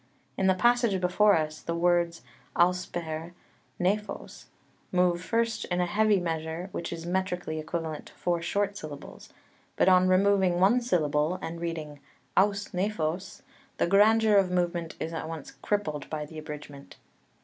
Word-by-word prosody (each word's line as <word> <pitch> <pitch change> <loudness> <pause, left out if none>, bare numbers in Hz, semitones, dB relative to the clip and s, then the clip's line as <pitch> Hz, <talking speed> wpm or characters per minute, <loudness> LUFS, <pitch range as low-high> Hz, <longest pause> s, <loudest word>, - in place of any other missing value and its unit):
In 190 - +1
the 190 - +4
passage 240 -1 +3
before 200 +3 +4
us 155 -1 -3
the 170 - -3
words 170 -1 +1 0.3
ὥσπερ 175 -2 0 0.5
νέφος 205 +4 -2 0.5
move 180 -1 +2
first 230 +3 0
in 175 0 -1
a 180 - +2
heavy 210 +2 +3
measure, 165 +1 -3
which - - -4
is 165 -1 -6
metrically 180 -3 -2
equivalent 160 -1 -4
to - - -15
four 175 -1 -1
short 200 +3 -1
syllables: 150 -7 -9 0.5
but - - +2
on 185 0 +6
removing 185 -1 +3
one 210 +7 +4
syllable, 155 -6 +1
and 165 +1 -6
reading 155 -4 -5 0.4
ὡς 200 +1 +2
νέφος, 180 -2 -2 0.4
the - - +2
grandeur 210 +3 +5
of 195 -2 +3
movement 175 -2 -1
is 165 - -4
at 160 - -4
once 165 -1 -7
crippled 155 -9 -2
by 155 -1 -3
the 155 +1 -9
abridgment. 150 -2 -9
175 Hz, 150 wpm, -28 LUFS, 160-195 Hz, 0.5 s, on